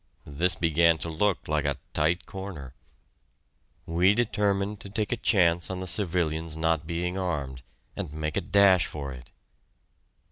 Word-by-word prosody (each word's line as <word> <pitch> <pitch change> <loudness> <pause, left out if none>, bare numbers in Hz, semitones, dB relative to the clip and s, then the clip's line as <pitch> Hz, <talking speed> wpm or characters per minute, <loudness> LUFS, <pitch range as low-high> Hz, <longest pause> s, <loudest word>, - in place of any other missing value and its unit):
This 85 +5 0
began 85 0 +3
to 80 +2 -5
look 95 +4 0
like 75 -1 0
a 70 -2 -1 0.2
tight 80 +4 +1
corner. 95 -10 -8 1.1
We 90 +5 +3
determined 105 -3 0
to 100 - -8
take 105 +1 -2
a - - +2
chance 90 -7 +2
on 95 -1 -3
the 95 - -4
civilians' 85 -4 -1
not 80 -1 0
being 90 +2 -2
armed, 70 -8 -3 0.3
and - - -5
make 75 0 -4
a - - +1
dash 100 -3 +4
for 70 -2 -6
it. 65 -1 -11
85 Hz, 150 wpm, -27 LUFS, 75-95 Hz, 1.1 s, dash